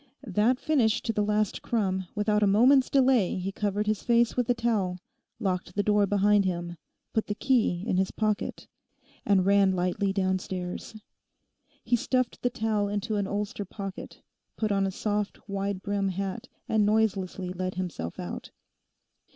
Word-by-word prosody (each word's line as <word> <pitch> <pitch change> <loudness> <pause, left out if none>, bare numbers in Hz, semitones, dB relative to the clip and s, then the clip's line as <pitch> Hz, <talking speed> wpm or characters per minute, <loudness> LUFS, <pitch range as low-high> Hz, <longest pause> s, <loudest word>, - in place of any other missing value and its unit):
That 220 +5 +2
finished 250 -9 +1
to 225 - 0
the 210 - 0
last 210 -1 0
crumb, 190 -5 -1
without 210 0 +1
a 205 - +4
moment's 255 +7 +5
delay 260 -7 +3
he 185 +1 -3
covered 205 +1 -1
his 215 -1 0
face 235 -1 +2
with 245 -2 0
a 245 - +4
towel, 215 -6 0 0.4
locked 185 -2 -2
the 205 - +1
door 210 -1 +3
behind 205 +1 +3
him, 175 -2 -3 0.4
put 220 - 0
the 205 - -2
key 220 -8 +1
in 185 - 0
his 190 0 +2
pocket, 215 -2 -2 0.6
and 195 -2 +4
ran 200 -1 +4
lightly 185 +2 0
downstairs. 185 0 -2 0.9
He 245 - +2
stuffed 255 +1 -1
the 245 - +1
towel 220 -4 0
into 210 +2 -2
an 200 -1 -1
ulster 205 +2 -3
pocket, 195 0 -8 0.3
put 215 -2 0
on 195 -1 +2
a - - -2
soft, 210 +1 -3
wide 200 -1 -3
brimmed 200 -2 -1
hat, 195 +4 -4 0.2
and 220 -1 +2
noiselessly 200 -4 0
let 185 0 -3
himself 175 - -4
out. 90 - -6
205 Hz, 160 wpm, -27 LUFS, 190-220 Hz, 0.9 s, moment's